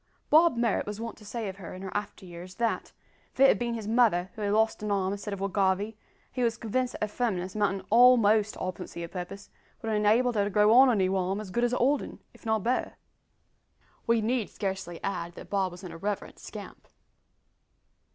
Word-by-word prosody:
Bob 320 -4 +6
Marrot 235 -4 +1
was 210 0 -5
wont 230 0 -5
to 215 - -15
say 220 +1 -4
of 190 0 -6
her, 185 -2 -8
in 185 - -9
after 205 -2 -5
years, 180 +1 -10
that, 230 -1 -1 0.4
"if - - -21
it 275 - +8
had - - +3
bin 235 -1 -1
his 220 -2 -5
mother 215 -6 +2
who 220 - -9
had 205 -1 0
lost 220 +1 +2
an 210 - -3
arm 195 -1 0
instead 205 +1 -6
of 200 - -4
Will 195 - -1
Garvie, 200 +2 0 0.4
he 250 - -3
was 230 -2 +1
convinced 250 +3 -1
that - - -4
her - - +1
firmness, 195 -5 -2
amountin' 195 -2 0
a'most 220 -3 +5
to - - -11
obstinacy, 185 -2 -5
of 170 - -7
purpose, 195 +2 -7 0.3
would 225 - -5
have 215 - +1
enabled 230 +4 +3
her 205 -2 +1
to - - -1
grow 210 +2 +4
on 260 +2 +8
a 240 - +3
noo 190 -1 +1
arm 190 +2 -1
as 210 -3 -7
good 240 +5 0
as 240 - +3
the 250 - -1
old 280 +4 +2
'un, - - -8 0.2
if - - -13
not 220 -2 +1
better." 250 +2 -1 1.1
We 230 -1 +3
need 230 0 0
scarcely 190 -4 -4
add 170 -3 -3
that - - -11
Bob 195 -2 +1
was 180 +2 -12
an 180 - -7
irreverent 195 +5 -4
scamp! - - -10
210 Hz, 225 wpm, -28 LUFS, 190-230 Hz, 1.1 s, it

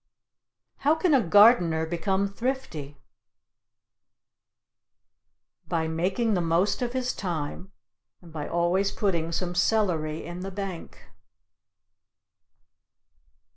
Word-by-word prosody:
How 295 +3 +2
can 330 -1 +1
a 270 - +5
gardener 180 -5 +5
become 190 +4 -1
thrifty? 200 - -4 2.7
By 160 -1 -1
making 185 +8 0
the 180 - +1
most 170 +7 +1
of 245 0 -2
his 255 -1 -1
thyme, 175 +1 -5 0.5
and 170 -3 -16
by 150 -2 -5
always 175 +3 +1
putting 170 -6 -1
some 175 +1 -2
celery 175 -5 0
in 175 +1 -7
the 190 +1 -5
bank. 195 -3 -7
180 Hz, 95 wpm, -26 LUFS, 165-210 Hz, 2.7 s, a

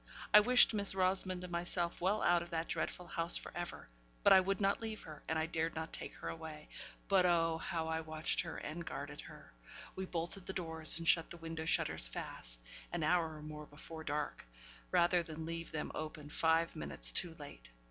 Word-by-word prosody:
I 210 - +11
wished 245 +2 +6
Miss 200 -2 0
Rosamond 185 -1 +3
and 180 - -7
myself 175 0 -2
well 195 +4 +1
out 175 -1 +4
of 170 - -8
that 165 0 -2
dreadful 180 - -3
house 170 0 0
for - - -7
ever; 175 - -6 0.4
but - - +8
I 190 - +9
would 195 +1 0
not 200 +1 +1
leave 220 -1 -5
her, 155 -2 -10
and 160 - 0
I 160 - +1
dared 165 0 -2
not 160 0 -5
take - - -5
her - - -7
away. 160 -2 -7 0.4
But 190 -2 +4
oh, 165 -2 +2
how 165 -2 -2
I 160 0 -1
watched 155 0 0
her, 170 -2 -6
and 165 +3 -5
guarded - - -6
her! - - -13 0.4
We 190 - -3
bolted 175 +2 -3
the 190 - -3
doors, 160 -3 +1
and 165 0 -2
shut 165 -1 +4
the 175 - -7
window 165 -1 -5
shutters 110 - +1
fast, - - -3 0.3
an - - -2
hour 160 0 +2
or 150 - -10
more 150 0 -8
before 160 +2 -10
dark, 150 -1 -3 0.5
rather 175 - +3
than 160 -1 -7
leave 165 0 -5
them 155 - -4
open 155 -1 -6
five 165 +2 +2
minutes 155 - +3
too 175 -3 +4
late. 145 - -11
165 Hz, 205 wpm, -35 LUFS, 160-180 Hz, 0.5 s, I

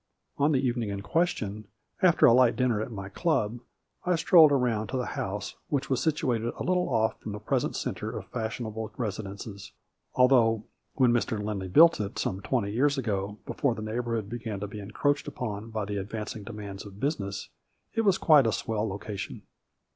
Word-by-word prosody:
On 145 +2 +4
the 140 - +3
evening 120 -3 0
in 100 -1 -4
question, 110 - -1 0.3
after 180 -3 +5
a 115 - +7
light 125 -2 +5
dinner 120 -3 +1
at 110 - -4
my 95 -3 -6
club, 120 - 0 0.4
I 180 0 +2
strolled 165 -2 +7
around 120 -6 +1
to 130 - -3
the 125 - -1
house, 100 +2 -3
which 140 -2 -2
was 130 - +2
situated 120 -7 0
a - - -3
little 180 0 +1
off 110 -3 +1
from 105 - -6
the 105 - -5
present 105 - -1
center - - -3
of - - -6
fashionable 110 -1 -4
residences, 100 -2 -5 0.4
al 125 0 +7
though 115 -4 +4 0.3
when 125 -3 +4
Mr. 115 -2 0
Lindley 105 -2 -3
built 165 - +6
it, 100 - -5
some 95 +1 -2
twenty 105 -2 -1
years 140 +6 +2
ago, 105 -4 -2
before 130 -5 0
the 110 - -6
neighborhood 115 -1 -2
began 110 -2 -5
to 105 - -3
be 105 +1 -8
encroached 145 +9 -1
upon 115 -6 -5
by 110 -2 -3
the 105 0 -3
advancing 105 +2 -5
demands 100 -3 -7
of 100 -1 -12
business, 100 -9 -2 0.4
it 225 - +1
was 195 -4 +3
quite 150 -6 +6
a - - +2
swell 110 -1 -1
location. 100 -1 -6
110 Hz, 185 wpm, -28 LUFS, 105-130 Hz, 0.4 s, a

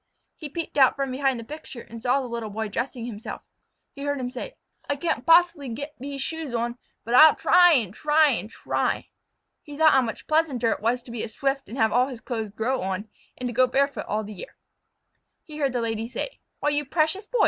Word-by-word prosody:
He 305 - -7
peeped 320 0 -3
out 265 - +6
from 275 -1 -2
behind 265 -1 0
the - - -7
picture 275 -2 -9
and 230 0 -11
saw 250 +3 +2
the 255 - -5
Little 235 -2 -4
Boy 220 +1 -3
dress 245 +7 -3
himself. 230 -2 -7 0.5
He 280 - -10
heard 285 0 -1
him 250 -1 -3
say: - - -7 0.3
"I 285 - +1
can't 280 -4 -2
poss'bly 330 -7 +4
get 285 +4 -6
vese 275 +2 -5
shoes 305 -2 -3
on, 235 +1 -2 0.3
but 235 - -3
I'll 310 +4 +9
try 355 -1 +6
and 220 - +1
try 300 +4 +4
and 225 -3 -2
try." - - -2 0.5
He 290 -2 -10
thought 315 0 +6
how 265 - +5
much 230 -3 -5
pleasanter 290 -8 +1
it - - -2
was 240 +3 0
to 235 - -11
be 235 -2 -4
a - - -4
Swift 270 0 -2
and 235 - -7
have 220 -3 +3
all 250 +3 +3
his 255 -4 -7
clothes 225 -3 -4
grow 230 +6 -1
on, 190 +3 -3 0.3
and 250 - -3
to 240 - -4
go 255 +2 +4
barefoot 280 +3 0
all 215 +1 -1
the 210 +1 -8
year. 190 - -10 0.9
He 305 -1 -10
heard 275 -2 +1
the 245 -1 -1
Lady 225 0 -2
say: - - -5 0.2
"Why, 295 - +2
you 295 0 0
precious 320 +7 0
Boy! - - -2
260 Hz, 225 wpm, -25 LUFS, 230-295 Hz, 0.9 s, I'll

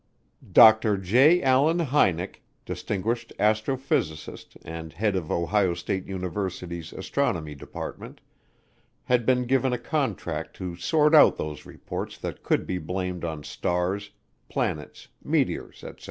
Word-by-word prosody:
Dr. 110 -2 +7
J. 130 - +4
Allen 135 +5 +4
Hynek, 110 - +1 0.2
distinguished 115 +4 -3
astrophysicist 110 - -1
and 80 0 -7
head 105 -2 0
of 85 -4 -3
Ohio 90 +1 +1
State 95 +2 -3
University's 90 -3 -4
Astronomy 95 - -2
Department, 70 - -8 0.8
had 120 -2 +1
been 125 -1 +3
given 130 0 +2
a - - 0
contract 130 - -3
to 90 -2 -5
sort 150 - +2
out 155 - +7
those 75 -1 -6
reports - - -6
that - - -6
could - - 0
be 90 - -2
blamed 90 +1 -4
on 80 -3 -4
stars, 90 +6 -2 0.4
planets, 75 - -3 0.2
meteors, - - -1
etc. - - -9
100 Hz, 125 wpm, -26 LUFS, 85-125 Hz, 0.8 s, Dr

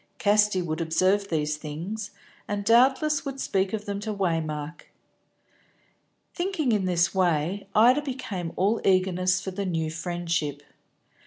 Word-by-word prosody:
Casti 205 -2 +3
would 160 0 -3
observe 185 +5 +2
these 150 -3 -1
things, 170 +8 -6 0.4
and 205 -1 -3
doubtless 265 +6 +4
would 275 -1 -5
speak 190 -4 0
of 210 -1 -4
them 200 -1 -3
to 215 +1 -4
Waymark. 165 -5 -3 1.5
Thinking 345 -8 -1
in 205 -4 +1
this 175 -2 +2
way, 180 +1 0
Ida 245 +6 +6
became 235 - -5
all 205 +5 +1
eagerness 185 -1 +2
for 190 - -5
the 200 +2 -4
new 165 -4 -2
friendship. 165 -4 -3
190 Hz, 135 wpm, -26 LUFS, 165-215 Hz, 1.5 s, Ida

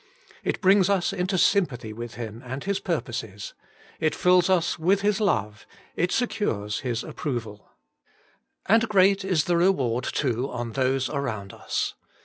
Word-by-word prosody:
It - - -2
brings 190 -1 +5
us 195 -1 +1
into 185 0 -1
sympathy 135 - +1
with 120 +1 -7
Him 115 -1 -7
and 130 +2 -6
His 200 0 -1
purposes; 115 - -4 0.5
it 155 -1 +1
fills 180 0 +4
us 175 -3 +1
with 190 +5 +2
His 210 +1 +1
love; 105 - -1 0.3
it 180 +1 0
secures 110 - -1
His 120 -4 -2
ap - - -10
proval. 115 -7 -4 1.1
And 225 +2 +3
great 195 -1 +4
is 185 -5 +1
the 175 -1 +1
reward, 135 -10 +2
too, 130 -1 -1
on 120 -1 -4
those 130 +1 +1
around 110 -9 -4
us. - - -2
155 Hz, 150 wpm, -25 LUFS, 120-190 Hz, 1.1 s, brings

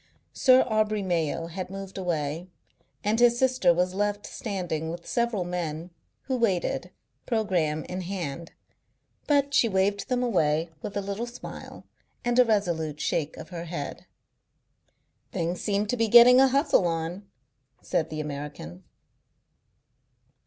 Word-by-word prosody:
Sir 260 -1 +5
Aubrey 215 -2 +1
Mayo 165 -3 -1
had 180 +2 -6
moved 195 0 -8
away, 165 -2 -2 0.6
and 215 +2 +1
his 240 0 +5
sister 255 -8 +3
was 180 +2 +1
left 205 +1 -1
standing 175 -7 -4
with 170 +1 -7
several 235 -5 0
men, 175 -1 -4 0.3
who 260 -2 -1
waited, 195 -7 0 0.4
programme 180 -10 0
in 185 +1 -5
hand, 170 -4 -5 0.8
but 285 -1 +2
she 230 - +4
waved 200 +3 0
them 250 -1 +1
away 165 -7 +1
with 205 - -5
a - - 0
little 200 +4 -4
smile 240 +1 -10 0.4
and 240 +1 +2
a 250 - +7
resolute 170 -9 0
shake 150 0 -1
of - - -9
her 170 -2 -6
head. 160 -4 -6 1.2
"Things 170 +1 -2
seem 205 0 0
to 215 - -1
be 225 -1 +2
getting 240 +3 +8
a 270 - +7
hustle 275 - +3
on," 170 +4 -3 0.6
said 160 - -1
the 155 - -5
American. 145 - -7
190 Hz, 140 wpm, -27 LUFS, 165-225 Hz, 1.2 s, getting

